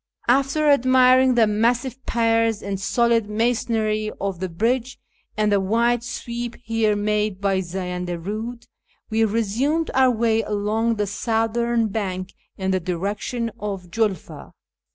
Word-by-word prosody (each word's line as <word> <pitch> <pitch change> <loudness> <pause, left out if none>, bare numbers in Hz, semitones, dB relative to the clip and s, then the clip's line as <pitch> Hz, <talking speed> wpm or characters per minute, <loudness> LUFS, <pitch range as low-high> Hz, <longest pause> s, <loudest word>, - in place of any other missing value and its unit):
After 275 +5 +2
admiring 255 -1 +5
the 230 -2 +5
massive 240 +4 0
piers 230 -2 +1
and 195 -1 -3
solid 230 +1 +1
masonry 220 -1 0
of 195 -3 -3
the 185 0 -3
bridge, 240 +9 -1 0.4
and 210 -1 +2
the 200 - +4
wide 230 +4 +1
sweep 240 0 -5
here 225 -2 +1
made 210 -1 -1
by 195 -1 +1
the - - 0
Zayanda 180 -1 -4
Eiid, 220 +7 -5 0.5
we 225 +1 +2
resumed 230 +9 0
our 260 -1 +5
way 225 -1 +2
along 215 +2 0
the 210 -1 -1
southern 225 +2 0
bank 190 -3 -4 0.2
in 190 0 -1
the 185 - +1
direction 200 +7 -3
of 195 -4 -5
Julfa. 210 -4 -3
225 Hz, 135 wpm, -22 LUFS, 200-235 Hz, 0.5 s, admiring